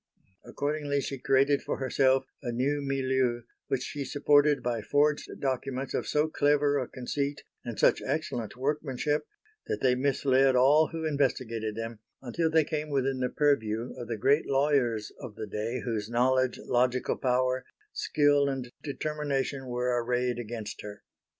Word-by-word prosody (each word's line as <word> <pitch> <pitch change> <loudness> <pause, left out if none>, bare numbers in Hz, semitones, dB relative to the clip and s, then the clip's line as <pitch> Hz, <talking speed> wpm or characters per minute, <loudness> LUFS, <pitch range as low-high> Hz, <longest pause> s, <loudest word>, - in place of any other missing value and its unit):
Accordingly 145 0 -2
she 135 -1 -4
created 135 +2 +3
for - - -3
herself 130 0 +2 0.2
a 120 - -3
new 140 +5 0
milieu 130 -3 0 0.3
which 130 -2 -1
she 145 +1 -4
supported 145 +1 +3
by 120 -2 -1
forged 145 +6 +1
documents 135 0 -2
of - - -2
so 150 +1 +2
clever 145 -1 +2
a 130 - -3
conceit 140 +3 -3 0.2
and - - -6
such - - +4
excellent 115 -1 -3
workmanship, 145 +2 -1 0.4
that - - -2
they 130 -1 +4
misled 135 0 +3
all 145 +5 +5
who 165 -1 -4
investigated 120 -7 -1
them, 115 0 -5 0.2
until 160 +6 -1
they 160 0 +4
came 150 +1 -3
within 135 -2 0
the 125 -1 0
purview 120 -6 0
of 120 - -7
the 115 -1 -3
great 140 +8 +2
lawyers 135 -6 +1
of 120 -6 -8
the - - -5
day 110 +4 -3
whose 110 -3 -2
knowledge, 130 +1 +2
logical 125 +1 +1
power, 130 0 +1 0.3
skill 145 -1 +2
and 130 -3 -4
determination 140 -2 -2
were 125 0 0
arrayed 125 0 0
against 110 -2 -6
her. 105 -1 -9
130 Hz, 150 wpm, -29 LUFS, 125-145 Hz, 0.4 s, all